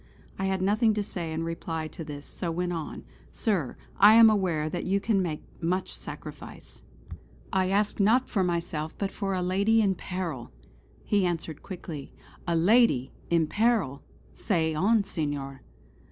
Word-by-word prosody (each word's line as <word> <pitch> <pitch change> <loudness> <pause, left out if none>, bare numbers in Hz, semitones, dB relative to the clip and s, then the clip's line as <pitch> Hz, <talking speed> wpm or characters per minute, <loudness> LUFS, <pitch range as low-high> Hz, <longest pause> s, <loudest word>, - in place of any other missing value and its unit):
I 195 - 0
had 190 -1 0
nothing 215 +3 +3
to 210 - 0
say 175 -5 -5
in 160 +1 -2
reply 165 -1 -4
to 165 - -8
this, 145 -2 -8
so 175 - -5
went 175 +1 -1
on: 165 -3 -5 0.3
"Sir, 185 - -1 0.2
I 210 +2 +8
am 225 -1 +9
aware 175 -7 0
that 175 +3 -3
you 195 +1 +1
can 200 -1 +1
make 160 -4 -3 0.2
much 180 +3 -1
sacrifice: - - -9 0.7
I 185 -1 +2
ask, 205 +2 +1
not 230 +6 +4
for 195 -4 0
myself, 170 -3 -2
but 195 -1 -2
for 195 -2 -2
a 180 - -1
lady 200 +5 +3
in 200 -3 +3
peril!" 170 -8 -5 0.5
He 205 -2 +2
answered 165 -3 -2
quickly: 170 -6 -7 0.4
"A 170 - +1
lady! 170 - +4 0.2
in 170 -1 +3
peril! 205 - +1 0.3
Say 165 -6 0
on 205 +7 +3
Senor!" 145 -7 -4
180 Hz, 160 wpm, -27 LUFS, 160-200 Hz, 0.7 s, am